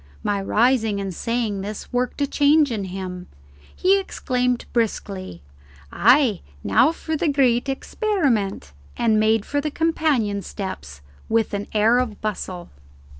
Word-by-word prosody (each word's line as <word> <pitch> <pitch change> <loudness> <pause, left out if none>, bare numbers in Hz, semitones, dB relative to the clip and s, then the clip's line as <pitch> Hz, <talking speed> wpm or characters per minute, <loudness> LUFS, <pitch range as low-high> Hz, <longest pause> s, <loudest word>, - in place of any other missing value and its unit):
My 200 -1 0
rising 220 0 +2
and 195 -2 -4
saying 225 0 -2
this 205 +4 -7
worked 250 +3 -1
a - - +4
change 290 0 +3
in 210 -4 -2
him. 185 -1 -6 0.5
He 390 +2 +3
exclaimed 250 -9 -1
briskly, 195 - -2 0.5
"Ay, 245 -3 +4 0.2
now 100 - +4
for 320 -1 -4
the 315 - 0
great 270 -3 +2
experiment," 270 - -1 0.3
and 220 -2 +2
made 220 0 +2
for 285 0 -1
the 305 - -2
companion 290 -10 0
steps 75 - -7 0.3
with 225 -1 +1
an 200 0 -3
air 220 +3 +4
of 230 -5 -3
bustle. 185 -4 -5
225 Hz, 135 wpm, -22 LUFS, 200-275 Hz, 0.5 s, a